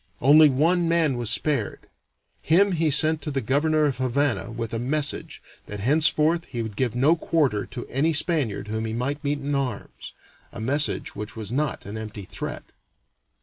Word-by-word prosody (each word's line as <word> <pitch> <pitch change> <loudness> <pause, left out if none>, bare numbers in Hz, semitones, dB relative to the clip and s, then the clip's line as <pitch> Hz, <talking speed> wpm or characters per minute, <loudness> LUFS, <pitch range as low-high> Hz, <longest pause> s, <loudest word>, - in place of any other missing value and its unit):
Only 150 +3 +7
one 165 +6 +2
man 165 -5 +2
was 120 -3 -1
spared; 135 -2 -1 0.6
him 195 +5 +3
he 165 -3 +1
sent 155 +2 +3
to - - -4
the 140 -2 -1
governor 150 +5 +1
of 135 -3 -1
Havana 130 0 0
with 115 -1 -5
a 115 - -1
message 145 +4 -2 0.2
that 105 - -6
henceforth 155 +6 +3
he 120 -3 -5
would 110 -2 -7
give 120 -1 -1
no 140 +7 +4
quarter 140 -11 0
to 120 -1 -7
any 145 +5 0
Spaniard 145 - 0
whom 110 +1 -3
he 110 - -4
might 135 +6 -3
meet 145 +1 0
in 145 0 -4
arms 130 -7 -4 0.4
a 115 - -9
message 140 +7 0
which 105 +2 -7
was 110 -2 -6
not 140 0 -2
an 105 +3 -6
empty 105 -2 -7
threat. 90 - -7
140 Hz, 180 wpm, -24 LUFS, 115-155 Hz, 0.6 s, Only